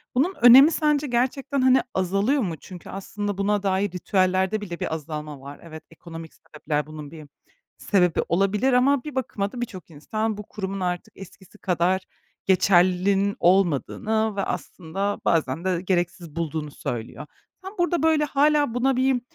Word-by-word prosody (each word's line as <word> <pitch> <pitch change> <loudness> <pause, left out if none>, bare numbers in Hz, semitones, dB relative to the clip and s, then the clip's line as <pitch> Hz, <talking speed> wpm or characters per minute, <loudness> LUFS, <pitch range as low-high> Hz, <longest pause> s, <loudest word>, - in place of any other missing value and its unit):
Bunun 305 +10 +2
önemi 260 +6 +9
sence 300 -2 +1
gerçekten, 265 +3 -1
hani, 260 0 +5
azalıyor 195 +9 +1
mu? 180 -7 -2
Çünkü 180 +3 -12
aslında 205 +1 -5
buna 205 0 0
dair 195 0 0
ritüellerde 185 +3 0
bile 175 -4 -6
bir - - -3
azalma 150 -2 -7
var. 140 +1 -10
Evet, 160 -2 -10
ekonomik 165 -1 -10
sebepler 150 -2 -4
bunun 155 -2 -9
bir 155 -2 -11 0.5
sebebi 180 -5 +2
olabilir 195 +8 +1
ama 255 +1 +3
bir 300 -3 -8
bakıma 220 -6 -2
da 245 - -7
birçok 185 -9 -7
insan 215 +8 -3
bu 210 - -6
kurumun 195 -2 -5
artık 180 -1 -3
eskisi 195 +1 -14
kadar 185 0 0 0.4
geçerliliğinin 190 +1 +3
olmadığını 195 - +1
ve 200 - -1
aslında 195 +4 -4
bazen 160 0 0
de 180 -2 0
gereksiz 175 -3 -2
bulduğunu 160 -2 -3
söylüyor. 120 +3 -6 0.4
Sen 380 +1 -8
burada, 350 -1 +1
böyle, 315 -2 +3
hâlâ 290 -2 +2
buna 255 +2 +1
bir, 260 -1 +2
195 Hz, 150 wpm, -24 LUFS, 170-245 Hz, 0.5 s, önemi